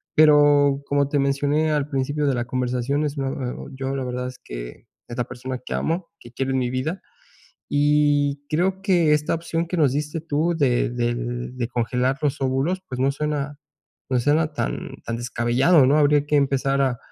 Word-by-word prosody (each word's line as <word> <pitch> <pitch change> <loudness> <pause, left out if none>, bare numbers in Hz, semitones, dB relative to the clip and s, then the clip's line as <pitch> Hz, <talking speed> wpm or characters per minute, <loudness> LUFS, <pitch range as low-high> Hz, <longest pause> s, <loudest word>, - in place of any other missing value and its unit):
Pero 145 -2 +5
como 140 -1 +1
te 145 - +1
mencioné 145 +3 +1
al 150 -1 0
principio 145 +2 -1
de 135 - +2
la 120 - -2
conversación, 125 +3 -1
es 145 0 -4
muy, 135 -1 -1 0.2
eh, - - -3
oh, - - -8
yo, 135 +1 -3
la 135 -1 -3
verdad, 125 0 -3
es 130 - -9
que, - - -8 0.2
es 120 - -7
la 125 - 0
persona 125 +1 -6
que - - -4
amo, 170 +2 -2
que 120 - -14
quiero 135 +2 -2
en 130 - +1
mi 125 -1 -1
vida. 135 +9 -3 0.7
Y 145 -1 +2
creo 185 +4 0
que 175 -6 +3
esta 150 0 +1
opción 165 0 -2
que 180 - -3
nos 145 -5 +3
diste 150 +2 -2
tú 165 +2 0
de 130 -5 +2
de 120 0 -1 0.4
de 125 -2 -3
congelar 125 +2 0
los 145 -2 -1
óvulos, 135 +8 0
pues, 125 -1 -5
no 135 +1 +2
suena 145 0 -3 0.5
no 130 -2 +2
suena 155 +5 +2
tan - - -3
tan 115 - -2
descabellado, 120 +6 +3
¿no? 145 - +4
Habría 145 -1 +4
que 150 0 0
empezar 140 0 +1
a 130 -3 +1
140 Hz, 195 wpm, -23 LUFS, 130-150 Hz, 0.7 s, Pero